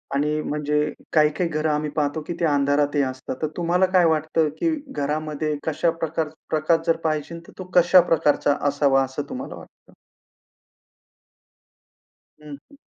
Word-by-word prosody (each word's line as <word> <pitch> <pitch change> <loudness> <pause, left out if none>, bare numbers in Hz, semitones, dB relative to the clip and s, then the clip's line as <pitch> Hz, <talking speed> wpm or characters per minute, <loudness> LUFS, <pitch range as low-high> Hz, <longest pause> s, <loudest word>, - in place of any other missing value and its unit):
आणि 150 +2 0
म्हणजे 150 0 -1 0.2
काही-काही 155 +2 +2
घरं 155 0 -1
आम्ही 150 0 -1
पाहतो, 150 +1 -1
की - - -3
ते 170 - +1
अंधारातही 145 0 +2
असतात. 130 -1 -5
तर 155 - +1
तुम्हाला 175 +2 +2
काय 180 -2 +5
वाटतं, 155 0 +1
की 335 - +1 0.2
घरामध्ये 150 - -2
कशा 160 +2 +1
प्रकार 165 -1 -3 0.2
प्रकाश 165 +2 +1
जर 165 - +3
पाहिजे, 155 +1 -2
तर - - -13
तो - - -4
कशा 175 +1 +7
प्रकारचा 145 -3 +2
असावा 140 -1 +2
असं 130 +2 -4
तुम्हाला 260 +2 -6
वाटतं? - - -16 2.5
हं, 150 -1 -9 0.2
हं. 285 - -17
155 Hz, 145 wpm, -23 LUFS, 145-165 Hz, 2.5 s, कशा